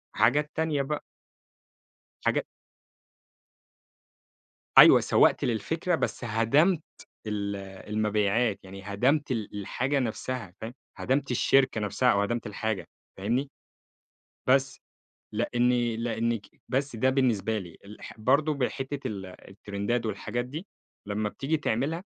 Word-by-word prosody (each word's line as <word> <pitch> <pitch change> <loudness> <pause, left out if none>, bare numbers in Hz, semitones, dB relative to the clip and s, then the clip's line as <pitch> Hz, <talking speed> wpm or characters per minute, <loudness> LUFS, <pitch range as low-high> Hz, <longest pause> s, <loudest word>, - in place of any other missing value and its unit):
حاجات 145 +8 +3
تانية 160 -3 +1
بقى 150 +2 -3 1.2
حاجا - - +1 2.3
أيوة - - +10
سوَّقت - - +3
للفكرة، 160 - 0
بس 130 - -3
هَدمت 140 - +3 0.4
ال 100 -1 -2 0.3
المبيعات، 105 0 +1
يعني 95 +1 -10
هدمت 130 +9 +1
ال 110 -4 -3
الحاجة 135 +8 -1
نفسها، 120 -4 -3
فاهم؟ 115 +2 -6 0.2
هدَمت 135 0 0
الشركة 130 -2 +3
نفسها، 105 +5 +2
أو 100 - +2
هَدَمت 120 +3 -2
الحاجة، 105 -2 -3 0.3
فاهمني؟ 120 +8 -1 1.0
بس، 135 0 +3 0.5
لأني 120 -1 +1
لأنك 115 -1 -1 0.3
بس 135 -1 -1
ده 130 +4 +2
بالنسبة 115 -5 +1
لي، 85 -3 -10
الح 105 +2 -11
برضو 140 +7 +3
بحتّة 135 +1 -2
ال 100 -3 -5
التِرِندات 100 +5 -4
والحاجات 110 +3 -3
دي، 155 +10 -7 0.4
لمّا 105 0 -1
بتيجي 150 +8 -1
تعملها 145 +6 -1
120 Hz, 110 wpm, -28 LUFS, 105-135 Hz, 2.3 s, أيوة